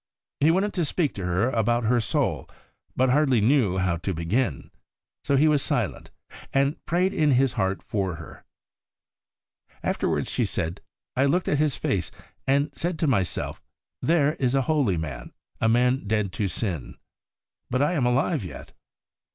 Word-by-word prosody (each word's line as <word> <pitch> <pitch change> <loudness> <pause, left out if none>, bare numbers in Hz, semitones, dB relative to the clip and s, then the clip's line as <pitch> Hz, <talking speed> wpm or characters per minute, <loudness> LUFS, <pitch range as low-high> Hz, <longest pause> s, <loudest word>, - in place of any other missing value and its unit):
He 150 - +4
wanted 195 +5 +2
to 175 - 0
speak 155 0 0
to 95 - -5
her 90 +8 +1
about 120 +1 +1
her 120 +2 +2
soul, 110 - -1 0.5
but 130 0 +3
hardly 135 -2 +3
knew 110 -4 +3
how 90 -2 +1
to 90 +2 -3
begin, 85 - -1 0.5
so 140 - +1
he 150 +3 +5
was 150 -2 +3
silent, - - -2 0.4
and 140 +3 +1
prayed 180 +3 +1
in 155 -5 +3
his 130 -1 +3
heart 95 0 -1
for 95 -5 -2
her. - - -11 1.4
Afterwards - - 0
she - - 0
said, 80 +2 -3 0.2
' - - -67
I 130 - +3
looked 175 +6 +1
at 145 - +1
his 150 -3 +2
face, 90 -4 -1 0.4
and 140 +2 +2
said 175 0 -2
to 160 - 0
myself, 100 - -1 0.4
"There 155 -3 +3
is 130 0 +1
a 135 - +2
holy 130 - +1
man, 70 -7 -6 0.3
a 110 - +2
man 125 0 +2
dead 105 -3 0
to 100 +1 -1
sin. 90 - -4 0.7
But 130 +3 +1
I 150 - +1
am 135 -8 +1
alive 135 - +1
yet." 85 -7 -9
125 Hz, 165 wpm, -25 LUFS, 95-145 Hz, 1.4 s, he